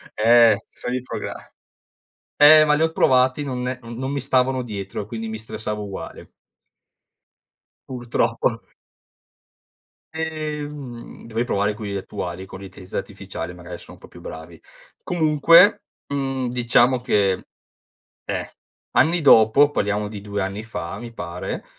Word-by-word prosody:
Eh, 115 Hz, -1 st, +6 dB
scegli 125 Hz, +1 st, -5 dB
il 130 Hz, -, -3 dB
progra -, -, -7 dB, 0.8 s
eh, 155 Hz, +1 st, +8 dB
ma 150 Hz, -, +3 dB
li 155 Hz, -, +2 dB
ho 160 Hz, -, +1 dB
provati, 130 Hz, -1 st, +3 dB
non 125 Hz, -2 st, -3 dB, 0.2 s
non 120 Hz, +3 st, -5 dB
mi 140 Hz, -, -2 dB
stavano 130 Hz, -1 st, +1 dB
dietro, 105 Hz, -3 st, -5 dB
quindi 110 Hz, 0 st, -6 dB
mi 110 Hz, -, -5 dB
stressavo 105 Hz, -1 st, -5 dB
uguale. 100 Hz, -1 st, -8 dB, 1.6 s
Purtroppo. 115 Hz, -2 st, -1 dB, 1.5 s
Ehm, 150 Hz, -5 st, -6 dB
dovrei 115 Hz, +1 st, -1 dB
provare 100 Hz, 0 st, 0 dB
quelli 105 Hz, -2 st, -6 dB
attuali 95 Hz, -1 st, -6 dB
con 95 Hz, -, -10 dB
l'intelligenza 95 Hz, -1 st, -9 dB
artificiale, 95 Hz, -4 st, -6 dB
magari 90 Hz, 0 st, -9 dB
son -, -, -13 dB
un -, -, -21 dB
po' -, -, -14 dB
più -, -, -15 dB
bravi. 80 Hz, +1 st, -10 dB, 0.4 s
Comunque, 165 Hz, +3 st, +5 dB, 0.2 s
mhmm, 135 Hz, -2 st, -2 dB
diciamo 120 Hz, +1 st, +3 dB
che, 100 Hz, -6 st, +1 dB, 0.8 s
eh, -, -, -4 dB, 0.4 s
anni 170 Hz, +2 st, +3 dB
dopo- 140 Hz, +1 st, +6 dB
parliamo 105 Hz, -4 st, -1 dB
di 105 Hz, -1 st, -8 dB
2 100 Hz, 0 st, -3 dB
anni 95 Hz, +3 st, -4 dB
fa, 85 Hz, -6 st, -6 dB
mi 120 Hz, -1 st, -9 dB
pare. 85 Hz, -4 st, -6 dB
115 Hz, 130 wpm, -22 LUFS, 100-135 Hz, 1.6 s, eh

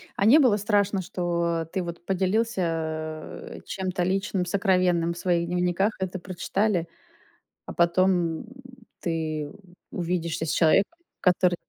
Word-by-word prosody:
А 200 Hz, -, +1 dB
не 270 Hz, +9 st, +8 dB
было 240 Hz, -7 st, +4 dB
страшно, 205 Hz, -2 st, +1 dB
что 170 Hz, -2 st, -1 dB
ты 190 Hz, -, 0 dB
вот 170 Hz, 0 st, -7 dB
поделился 170 Hz, -6 st, -2 dB
чем-то 185 Hz, -2 st, -2 dB
личным, 190 Hz, 0 st, 0 dB
сокровенным 180 Hz, -3 st, +2 dB
в 170 Hz, -, -11 dB
своих 170 Hz, -1 st, +1 dB
дневниках, 180 Hz, +4 st, +1 dB
это 190 Hz, 0 st, -3 dB
прочитали, 185 Hz, 0 st, -1 dB, 0.8 s
а -, -, -7 dB
потом, 175 Hz, +2 st, +3 dB, 0.3 s
м, -, -, -11 dB, 0.5 s
ты 155 Hz, -3 st, -2 dB, 0.4 s
увидишься 170 Hz, -2 st, -2 dB
с -, -, -1 dB
человеком, 195 Hz, -, +3 dB, 0.2 s
который 180 Hz, 0 st, +3 dB
180 Hz, 125 wpm, -26 LUFS, 170-195 Hz, 0.8 s, не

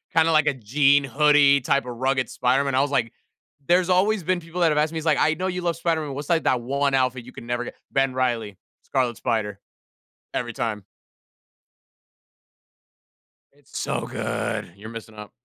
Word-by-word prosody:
kinda 165 Hz, 0 st, +4 dB
like, 155 Hz, -1 st, +4 dB
a 150 Hz, -, +3 dB
jean, 140 Hz, +4 st, +3 dB
hoodie 140 Hz, +1 st, +4 dB
type 140 Hz, +1 st, +1 dB
of 120 Hz, -, -5 dB
rugged 130 Hz, -1 st, 0 dB
Spider-Man, 135 Hz, +2 st, +1 dB
I 130 Hz, -, +4 dB
was 145 Hz, 0 st, -1 dB
like 115 Hz, -5 st, 0 dB, 0.6 s
There's 180 Hz, +1 st, +3 dB
always 190 Hz, +2 st, +2 dB
been 185 Hz, +2 st, 0 dB
people 165 Hz, +2 st, -6 dB
that 170 Hz, -, +5 dB
have 150 Hz, -, 0 dB
asked 155 Hz, +2 st, 0 dB
me, -, -, -3 dB
it's 160 Hz, -, -8 dB
like, 155 Hz, -3 st, +3 dB
"I 155 Hz, -, +3 dB
know 185 Hz, +3 st, -3 dB
you 180 Hz, -1 st, -3 dB
love 170 Hz, -1 st, -1 dB
Spider-Man. 160 Hz, -4 st, -1 dB
What's, 145 Hz, +1 st, -6 dB
like, 170 Hz, -2 st, +2 dB
that 125 Hz, -, +2 dB
one 140 Hz, +3 st, 0 dB
outfit 130 Hz, -2 st, 0 dB
you 125 Hz, -, -11 dB
can -, -, -10 dB
never 120 Hz, 0 st, -2 dB
get?" -, -, -8 dB, 0.2 s
Ben 135 Hz, -1 st, +1 dB
Reilly, 120 Hz, -6 st, -1 dB, 0.3 s
Scarlet 125 Hz, -3 st, -1 dB
Spider, 105 Hz, -4 st, -2 dB, 0.7 s
every 120 Hz, -1 st, -3 dB
time. 105 Hz, -2 st, -3 dB, 2.7 s
It's -, -, -12 dB
so -, -, -2 dB
good. -, -, -3 dB
You're 105 Hz, +3 st, -10 dB
missing 115 Hz, -1 st, -9 dB
out. 105 Hz, -1 st, -10 dB
140 Hz, 185 wpm, -24 LUFS, 120-160 Hz, 2.7 s, that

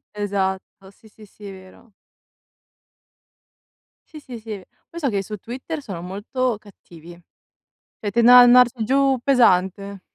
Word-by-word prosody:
Esatto, 195 Hz, -1 st, -4 dB
sì, 220 Hz, +2 st, -22 dB
sì, 215 Hz, 0 st, -17 dB
sì, 205 Hz, +1 st, -17 dB
è -, -, -8 dB
vero. 190 Hz, +4 st, -17 dB, 2.2 s
Sì, 310 Hz, -, -11 dB
sì, 255 Hz, -5 st, -11 dB
sì. 215 Hz, -3 st, -8 dB, 0.3 s
Poi 340 Hz, -, -9 dB
so 280 Hz, -5 st, -1 dB
che 200 Hz, -2 st, -2 dB
su 210 Hz, +2 st, -8 dB
Twitter 260 Hz, -, -7 dB
sono 195 Hz, -10 st, -8 dB
molto 210 Hz, +6 st, -3 dB
cattivi. 175 Hz, -4 st, -16 dB, 0.8 s
Cioè, 205 Hz, -, -4 dB
tendono 235 Hz, +2 st, +6 dB
ad 245 Hz, -, +9 dB
andarci 245 Hz, -1 st, +4 dB
giù 270 Hz, +2 st, +1 dB
pesante. 200 Hz, -6 st, +1 dB
215 Hz, 135 wpm, -21 LUFS, 195-250 Hz, 2.2 s, ad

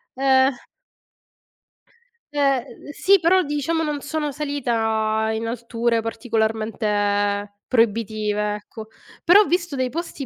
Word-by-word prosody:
Ehm 265 Hz, -1 st, +2 dB, 1.7 s
Eh, 275 Hz, -4 st, +2 dB
uhm, -, -, -13 dB
sì, 390 Hz, +5 st, +3 dB
però 365 Hz, +2 st, +3 dB
diciamo 295 Hz, +3 st, -1 dB
non 295 Hz, -2 st, -3 dB
sono 300 Hz, -1 st, -3 dB
salita 225 Hz, -6 st, -1 dB
in 225 Hz, +1 st, -3 dB
alture 230 Hz, 0 st, -1 dB
particolarmente 215 Hz, -3 st, -1 dB
proibitive, 215 Hz, -3 st, 0 dB
ecco. 215 Hz, +1 st, -10 dB, 0.4 s
Però 385 Hz, +5 st, +7 dB
ho -, -, +2 dB
visto 345 Hz, -4 st, -1 dB
dei 255 Hz, -1 st, -1 dB
posti 330 Hz, -4 st, -5 dB
235 Hz, 110 wpm, -22 LUFS, 220-290 Hz, 1.7 s, Però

